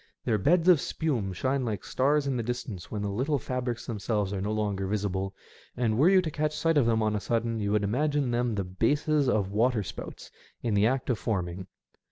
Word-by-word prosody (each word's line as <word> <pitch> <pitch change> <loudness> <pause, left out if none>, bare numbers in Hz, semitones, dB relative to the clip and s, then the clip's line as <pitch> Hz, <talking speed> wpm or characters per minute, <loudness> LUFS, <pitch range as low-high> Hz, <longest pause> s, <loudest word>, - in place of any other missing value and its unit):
Their 110 -4 +1
beds 170 - +3
of 175 -6 +6
spume 125 - -1
shine 130 +8 -1
like 110 -4 -3
stars 145 +3 +1
in 135 -2 0
the 120 - 0
distance 115 -5 -5
when 105 -1 -3
the 100 - -2
little 135 +8 0
fabrics 125 -1 -3
themselves 105 -3 -2
are 95 - -2
no 105 +2 -2
longer 100 -3 -1
visible, 95 -1 -2 0.4
and 115 -3 +1
were 145 +10 +5
you 190 -1 +5
to 160 - -3
catch 150 +1 -1
sight 165 0 +2
of 140 -6 +4
them 115 -1 +2
on 110 0 +1
a - - 0
sudden 115 +1 -1
you 100 -1 -1
would 105 -1 +2
imagine 140 +5 +1
them 120 -1 0
the 100 - -1
bases 140 +9 +1
of 100 -5 +1
water 110 +1 +2
spouts - - -8 0.3
in 115 -3 0
the 100 +1 +4
act 130 +1 0
of 115 - -1
forming. 95 -3 -3
115 Hz, 220 wpm, -28 LUFS, 100-135 Hz, 0.4 s, of